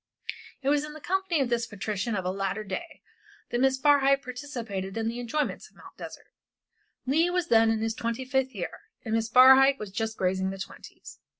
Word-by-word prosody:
It 270 Hz, -, +1 dB
was 290 Hz, 0 st, +2 dB
in 300 Hz, 0 st, -7 dB
the 310 Hz, -, -10 dB
company 365 Hz, -1 st, 0 dB
of 260 Hz, -, 0 dB
this 235 Hz, -1 st, 0 dB
patrician 210 Hz, +1 st, -3 dB
of 190 Hz, -2 st, -3 dB
a 180 Hz, -, 0 dB
later 195 Hz, +2 st, -2 dB
day 315 Hz, -, -7 dB, 0.5 s
that 240 Hz, -, 0 dB
Miss 265 Hz, 0 st, +3 dB
Barhyte 275 Hz, -1 st, +4 dB
participated 235 Hz, -7 st, -5 dB
in 225 Hz, 0 st, -1 dB
the 235 Hz, +2 st, -3 dB
enjoyments 245 Hz, +5 st, -3 dB
of -, -, -32 dB
Mt. -, -, -15 dB
Desert. -, -, -9 dB, 0.8 s
Leigh 315 Hz, +7 st, +2 dB
was 355 Hz, -1 st, -1 dB
then 225 Hz, -1 st, +5 dB
in 225 Hz, -1 st, 0 dB
his 225 Hz, 0 st, -1 dB
twenty 235 Hz, +3 st, -3 dB
fifth 265 Hz, 0 st, -1 dB
year, -, -, -5 dB, 0.3 s
and 220 Hz, -, -3 dB
Miss 225 Hz, 0 st, 0 dB
Barhyte 265 Hz, +3 st, +7 dB
was 210 Hz, -5 st, -7 dB
just 220 Hz, +2 st, -3 dB
grazing 190 Hz, 0 st, 0 dB
the 195 Hz, -, -6 dB
twenties. 190 Hz, -, -10 dB
240 Hz, 200 wpm, -27 LUFS, 215-275 Hz, 0.8 s, Barhyte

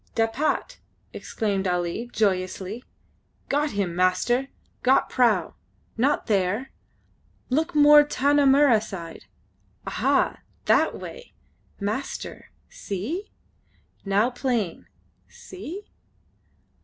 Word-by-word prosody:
"Dapat!" 240 Hz, -, -1 dB, 0.3 s
exclaimed 200 Hz, -3 st, -2 dB
Ali, 180 Hz, +6 st, -2 dB
joyously. 195 Hz, +2 st, -1 dB, 0.7 s
"Got 290 Hz, 0 st, 0 dB
him, 195 Hz, -4 st, -2 dB
master! 185 Hz, +9 st, +1 dB, 0.3 s
Got 260 Hz, +2 st, +3 dB
prau! 230 Hz, -8 st, +2 dB, 0.4 s
Not 270 Hz, +6 st, +1 dB
there! 205 Hz, +4 st, 0 dB, 0.8 s
Look 315 Hz, +5 st, 0 dB
more 295 Hz, 0 st, +8 dB
Tanah 285 Hz, 0 st, +2 dB
Mirrah 270 Hz, -5 st, +5 dB
side. 170 Hz, -6 st, -8 dB, 0.6 s
Aha! -, -, +1 dB, 0.3 s
That -, -, +3 dB
way! -, -, -10 dB, 0.5 s
Master, 215 Hz, +7 st, -4 dB, 0.2 s
see? 330 Hz, -, -5 dB, 0.7 s
Now 205 Hz, +5 st, +2 dB
plain. 240 Hz, -8 st, -2 dB, 0.4 s
See?" 375 Hz, +2 st, -9 dB
230 Hz, 85 wpm, -25 LUFS, 195-285 Hz, 0.8 s, more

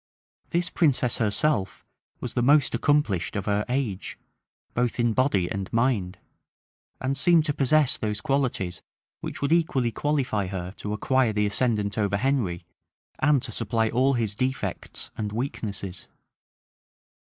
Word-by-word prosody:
This 175 Hz, +1 st, -1 dB
princess 140 Hz, -, +2 dB
herself 105 Hz, 0 st, 0 dB, 0.4 s
was -, -, -4 dB
the -, -, +1 dB
most 145 Hz, +4 st, +4 dB
accomplished 120 Hz, -, +1 dB
of 105 Hz, -, -2 dB
her 105 Hz, 0 st, +1 dB
age, 125 Hz, -7 st, -2 dB, 0.6 s
both 120 Hz, 0 st, 0 dB
in 120 Hz, -1 st, +2 dB
body 105 Hz, -8 st, +2 dB
and 100 Hz, 0 st, -4 dB
mind; 115 Hz, -6 st, +1 dB, 0.8 s
and 130 Hz, +1 st, -1 dB
seemed 165 Hz, +3 st, +4 dB
to 145 Hz, -, 0 dB
possess 140 Hz, +1 st, +3 dB
those 105 Hz, -1 st, -1 dB
qualities 120 Hz, -7 st, -1 dB, 0.4 s
which -, -, -6 dB
would 140 Hz, -, +1 dB
equally 140 Hz, -8 st, +2 dB
qualify 130 Hz, -9 st, 0 dB
her 90 Hz, -1 st, -4 dB
to 105 Hz, -, -4 dB
acquire 125 Hz, +1 st, +2 dB
the 105 Hz, 0 st, +1 dB
ascendant 105 Hz, -1 st, 0 dB
over 100 Hz, -1 st, +1 dB
Henry, 115 Hz, -9 st, 0 dB, 0.5 s
and 145 Hz, -4 st, +3 dB
to -, -, -5 dB
supply 115 Hz, 0 st, 0 dB
all 130 Hz, +4 st, +2 dB
his 115 Hz, -5 st, 0 dB
defects 130 Hz, +5 st, -3 dB
and 105 Hz, -1 st, -2 dB
weaknesses. 105 Hz, -6 st, -5 dB
120 Hz, 140 wpm, -26 LUFS, 100-135 Hz, 0.8 s, most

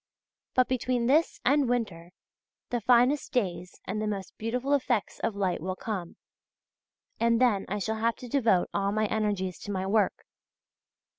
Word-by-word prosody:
But 255 Hz, -1 st, +4 dB
between 250 Hz, -1 st, 0 dB
this 300 Hz, +7 st, +2 dB
and 280 Hz, -1 st, +3 dB
winter, 185 Hz, -9 st, -2 dB, 0.6 s
the 240 Hz, -1 st, 0 dB
finest 250 Hz, +5 st, +3 dB
days 180 Hz, -7 st, -2 dB
and 210 Hz, +3 st, -3 dB
the 215 Hz, -, -1 dB
most 195 Hz, -3 st, -4 dB
beautiful 250 Hz, +5 st, -1 dB
effects 250 Hz, -6 st, 0 dB
of 225 Hz, -2 st, -1 dB
light 190 Hz, -5 st, -1 dB
will 185 Hz, +2 st, -3 dB
come, 190 Hz, -5 st, -5 dB, 1.0 s
and 230 Hz, 0 st, +3 dB
then 235 Hz, -6 st, +2 dB
I 205 Hz, -, -1 dB
shall 220 Hz, +2 st, -2 dB
have 230 Hz, +1 st, +1 dB
to 250 Hz, -, -10 dB
devote 230 Hz, -8 st, +2 dB
all 200 Hz, 0 st, 0 dB
my 215 Hz, +1 st, +1 dB
energies 205 Hz, -4 st, -1 dB
to 205 Hz, -, -6 dB
my 190 Hz, -1 st, -2 dB
work. 205 Hz, +1 st, +1 dB
220 Hz, 160 wpm, -28 LUFS, 195-245 Hz, 1.0 s, But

